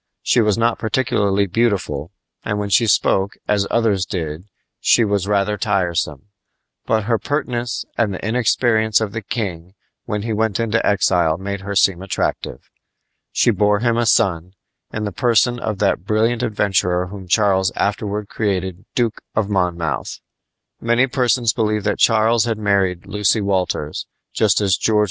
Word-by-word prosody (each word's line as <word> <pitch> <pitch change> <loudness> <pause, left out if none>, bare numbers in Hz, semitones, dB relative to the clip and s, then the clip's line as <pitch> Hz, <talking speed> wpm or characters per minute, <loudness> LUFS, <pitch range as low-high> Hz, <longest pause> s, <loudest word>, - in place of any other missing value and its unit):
She 120 - +3
was 105 -2 +2
not 115 0 +1
particularly 105 -4 +1
beautiful, 95 -7 -1 0.3
and 105 - -2
when 100 -1 -3
she 115 +3 +4
spoke 100 -1 +1
as 100 -1 +1
others 110 -5 +1
did 85 -3 -5 0.3
she 115 - +4
was 100 -2 -1
rather 105 0 +1
tiresome; 85 -3 -1 0.6
but 110 -1 +1
her 115 +1 0
pertness 125 -5 -3
and 110 -3 +2
the 95 +2 -5
inexperience 110 -2 +2
of 110 -3 -2
the 110 +1 -4
king 95 -5 -5 0.3
when 105 -3 -3
he 115 0 -2
went 110 -1 0
into 115 0 0
exile 90 -5 +2
made 100 +1 -5
her 100 +1 -5
seem 95 -2 +3
attractive. 95 -3 -3 0.6
She 120 - +3
bore 105 0 +1
him 120 -1 +2
a 120 0 +1
son, 90 -4 +1 0.4
in 110 - -4
the 105 - -3
person 120 +4 +2
of 110 -3 -3
that 100 -3 0
brilliant 110 +4 +1
adventurer 95 -5 0
whom 95 0 -9
Charles 95 -1 +2
afterward 105 0 -2
created 95 -3 -3
Duke 115 -3 0
of 105 -1 0
Monmouth. 90 -4 -2 0.6
Many 120 +2 +2
persons 125 -3 +1
believe 105 -2 0
that 105 0 -1
Charles 115 0 +3
had 115 -2 -1
married 100 -4 0
Lucy 105 +2 +1
Walters, 95 -6 -2 0.3
just 105 -2 +2
as 95 -2 +2
George 110 -1 +1
IV. - - +4
105 Hz, 160 wpm, -19 LUFS, 95-110 Hz, 0.6 s, she